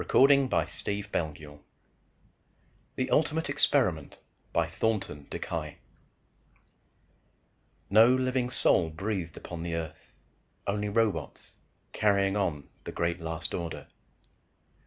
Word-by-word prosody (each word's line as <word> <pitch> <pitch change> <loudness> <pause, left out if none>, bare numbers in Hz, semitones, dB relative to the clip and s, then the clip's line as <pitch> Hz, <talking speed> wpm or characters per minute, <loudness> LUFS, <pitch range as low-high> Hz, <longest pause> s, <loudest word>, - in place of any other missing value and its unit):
pgdp.net 100 - +1 1.4
THE 130 - -1
ULTIMATE 160 +1 +2
EXPERIMENT - - +2 0.3
by - - +2
THORNTON 95 -10 -2
DeKY - - -4 2.2
_No 115 +5 +7
living 130 -1 0
soul 85 -8 +3
breathed 90 0 -4
upon 85 -2 -7
the 85 0 -3
earth. 80 -2 -6 0.5
Only 105 +1 -1
robots, 110 -1 -1 0.4
carrying 100 -2 +2
on 85 -9 -1 0.2
the 85 0 -1
last 80 0 -4
great - - -8
order. 85 -2 -6
100 Hz, 90 wpm, -29 LUFS, 80-115 Hz, 2.2 s, No